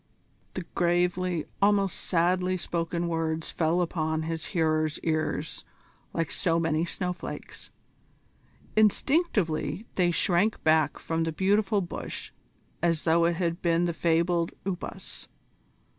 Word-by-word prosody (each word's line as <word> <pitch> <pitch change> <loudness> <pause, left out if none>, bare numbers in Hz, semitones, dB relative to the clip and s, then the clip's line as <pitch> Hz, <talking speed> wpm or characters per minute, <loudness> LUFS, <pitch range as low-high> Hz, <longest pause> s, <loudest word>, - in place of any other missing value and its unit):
The 185 - -3
gravely, 175 -1 +1 0.2
almost 200 -2 +3
sadly 180 +2 +1
spoken 170 0 -2
words 165 -1 -1
fell 165 +2 +1
upon 160 -2 -1
his 165 0 -3
hearer's 155 -4 +1
ears 155 -1 -1 0.5
like 165 -2 -2
so 170 -3 +1
many 165 0 +1
snowflakes. 180 +1 -5 1.1
Instinctively 210 - +2
they 180 -2 +2
shrank 180 +5 +2
back 155 -1 +3
from 165 0 -1
the 165 - -1
beautiful 200 +4 +2
bush 175 - -6 0.5
as 165 -2 +1
though 165 +1 +4
it 170 0 +2
had 170 0 -1
been 170 0 +2
the 170 - 0
fabled 170 +1 +1
Upas. 190 -2 -5
170 Hz, 115 wpm, -28 LUFS, 165-185 Hz, 1.1 s, though